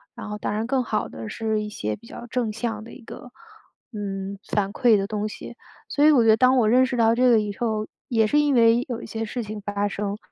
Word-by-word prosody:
然 230 -3 -8
后 210 - -4
当 - - -2
然 215 +2 -2
更 255 +1 0
好 215 - -2
的 110 -1 -8
是 220 -1 -2
一 210 - -5
些 105 - -3
比 230 +3 -17
较 - - -9
正 240 -2 -2
向 220 -1 -4
的 230 - -12
一 245 - -13
个 245 +1 -11 0.6
嗯， 195 -1 -5
反 200 -1 -1
馈 230 -3 +4
的 195 - -1
东 210 0 -3
西。 - - -9 0.3
所 290 - 0
以 - - +8
我 260 -6 +5
觉 225 - +3
得 220 - +6
当 255 +2 +4
我 225 -4 +3
认 255 +3 +4
识 245 - -3
到 225 -1 +4
这 250 +2 +3
个 230 -2 +5
以 205 -2 -3
后， 220 -2 -2 0.2
也 225 -2 +2
是 295 +8 +2
因 295 -2 +2
为 235 +1 +5
有 240 -2 -3
一 - - -7
些 225 0 -4
事 240 +2 -4
情 210 0 -7
发 205 0 -2
生， 205 0 -3
220 Hz, 280 characters per minute, -24 LUFS, 210-240 Hz, 0.6 s, 以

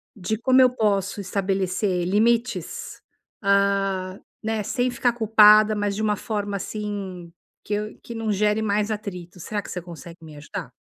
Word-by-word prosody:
de 205 +2 -2
como 260 +2 +4
eu 255 - +7
posso 205 -5 0
estabelecer 190 -1 -1
limites, 230 +5 0 0.4
ah, 195 -1 +1 0.2
né, 220 -1 -2
sem 245 +4 0
ficar 245 0 +1
culpada 215 -1 +6
mas 205 -1 -1
de 215 - -2
uma 210 -1 +1
forma, 205 -1 -3
assim, 195 -4 -5 0.3
que 210 - -4
eu 210 +1 -3
que 235 - -9
não 225 -1 -2
gere 210 +2 +1
mais 210 0 0
atrito, 190 -5 -6
será 205 +4 -3
que - - -12
você 180 - -4
consegue 170 0 -11
me 155 -2 -11
ajudar? 150 -1 -7
205 Hz, 160 wpm, -24 LUFS, 190-215 Hz, 0.4 s, eu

